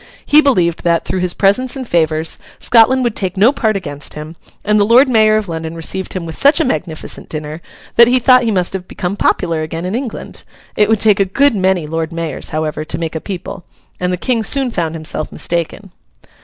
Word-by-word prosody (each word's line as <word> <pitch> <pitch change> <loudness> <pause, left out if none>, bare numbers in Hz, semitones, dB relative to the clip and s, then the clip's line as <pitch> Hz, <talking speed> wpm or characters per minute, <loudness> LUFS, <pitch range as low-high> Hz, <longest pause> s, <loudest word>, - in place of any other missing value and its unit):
He 300 +1 +6
believed 180 - +1
that, 170 -1 +1
through 185 - -2
his 180 -1 -1
presents 225 +7 +2
and 260 -2 -6
favours, 160 -2 0 0.2
Scotland 245 +3 +3
would 235 -3 -1
take 190 -1 -2
no 215 +7 +5
part 220 -7 0
against 145 -6 -7
him; 155 +2 -8 0.3
and 210 0 +3
the - - +4
Lord 240 +6 +5
Mayor 215 -3 +4
of 215 -2 -3
London 160 -1 -5
received 185 +3 -4
him 185 -3 -4
with 160 - -7
such 285 +4 +4
a 320 - +2
magnificent 160 - -3
dinner 155 +1 -6 0.4
that 235 - +8
he 250 +1 +4
thought 255 0 +5
he 235 - 0
must 185 -4 0
have 185 -1 -5
become 180 +2 -4
popular 170 -5 0
again 165 +2 -5
in 185 - -3
England. 245 0 -5 0.3
It 210 0 +2
would 220 -2 +2
take 210 -2 +4
a - - +5
good 275 +9 +2
many 190 -4 0
Lord 165 +1 -3
Mayors, 165 -2 -4
however, 155 0 -3
to 155 0 -4
make 165 -1 -4
a 160 - -4
people, 190 -1 -7 0.4
and 180 0 -1
the 180 - -1
King 235 +4 0
soon 265 +2 +1
found 165 -5 -2
himself 155 -1 -5
mistaken. 170 +3 -3
185 Hz, 215 wpm, -15 LUFS, 165-225 Hz, 0.4 s, that